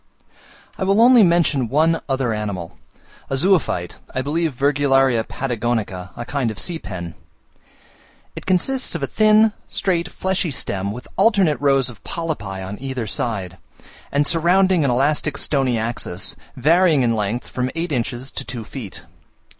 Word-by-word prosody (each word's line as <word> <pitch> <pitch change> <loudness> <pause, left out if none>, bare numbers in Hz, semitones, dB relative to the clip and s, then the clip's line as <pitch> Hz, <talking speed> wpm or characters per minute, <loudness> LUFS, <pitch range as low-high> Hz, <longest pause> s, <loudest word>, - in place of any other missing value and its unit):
I - - 0
will 195 +2 +3
only 245 0 +7
mention 170 - +3
one 160 +4 +2
other 135 -3 0
animal, 100 -5 -4 0.5
a 135 - 0
zoophyte 140 - +1 0.2
(I 130 - 0
believe 155 0 -1
Virgularia 135 -3 +3
Patagonica), 115 -8 -3
a 120 - -5
kind 130 -2 -1
of 110 - -6
sea 165 - -2
pen. 85 - -7 1.2
It - - -9
consists 225 +6 +1
of 160 - -3
a - - +3
thin, 215 +5 +4
straight, 175 -3 -1
fleshy 190 -2 -1
stem, 100 -7 -2
with 125 +4 -8
alternate 195 -8 +3
rows 135 -2 +3
of 120 -5 -11
polypi 105 - -4
on 100 +2 -7
each 130 -5 -4
side, 95 -6 -3 0.5
and 145 +1 +2
surrounding 175 +2 +3
an 140 - +2
elastic 140 +3 +1
stony 135 -5 +1
axis, 110 -5 -2 0.2
varying 160 +1 +4
in 115 -1 +2
length 105 +3 -2
from 125 0 -2
eight 165 0 -2
inches 125 0 -2
to - - -4
two 120 -3 -6
feet. 110 -4 -8
135 Hz, 150 wpm, -21 LUFS, 115-170 Hz, 1.2 s, only